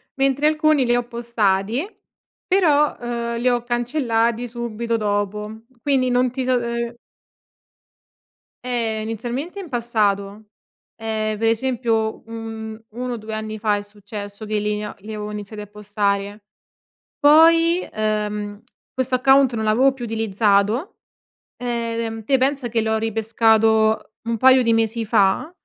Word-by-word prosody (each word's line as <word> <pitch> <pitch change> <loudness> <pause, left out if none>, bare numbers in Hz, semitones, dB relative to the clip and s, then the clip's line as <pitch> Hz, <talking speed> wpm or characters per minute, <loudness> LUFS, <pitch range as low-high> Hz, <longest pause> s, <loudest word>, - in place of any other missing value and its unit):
mentre 275 +2 +2
alcuni 310 -3 +3
li 240 0 +2
ho 245 - +1
postati. 235 - 0 0.6
Però, 305 -6 +3
uhm, 235 -1 -3
li 245 - 0
ho 240 -1 0
cancellati 240 -1 0
subito 235 -1 -3
dopo. 210 +1 -2 0.2
Quindi 265 -3 +2
non 250 0 +2
ti 260 +1 -3
so 255 0 +2
uhm 235 0 -3 1.7
Eh 230 -3 -1
inizialmente 240 - -4
in 370 -4 -8
passato. 215 -4 -1 0.5
Ehm, 220 -1 -2
per 225 +2 0
esempio, 230 -2 0
mhmm, 225 -1 -7
1 250 +1 -4
o - - -4
2 215 0 -6
anni 215 0 -5
fa 210 -1 +2
è 205 - -2
successo 205 0 -9
che 215 0 -1
li 210 0 -1
av 210 - -6
li 210 - -11
avevo 210 0 -5
iniziati 210 0 -7
a 210 - -9
postare. 205 0 -2 0.7
Poi, 330 +3 +6
ehm, 210 -1 -2 0.3
questo 260 0 0
account 270 0 +4
non 220 -1 -2
l'avevo 245 +6 +4
più 260 -2 -7
utilizzato. 220 - +1 0.6
Ehm, 230 -2 -3
te 270 +5 +3
pensa 265 -1 0
che 230 -1 0
l'ho 220 0 0
ripescato 220 0 +2 0.2
un 230 - 0
paio 260 +2 +6
di 230 -1 +2
mesi 225 0 0
fa 205 +6 +2
225 Hz, 140 wpm, -21 LUFS, 215-245 Hz, 1.7 s, Poi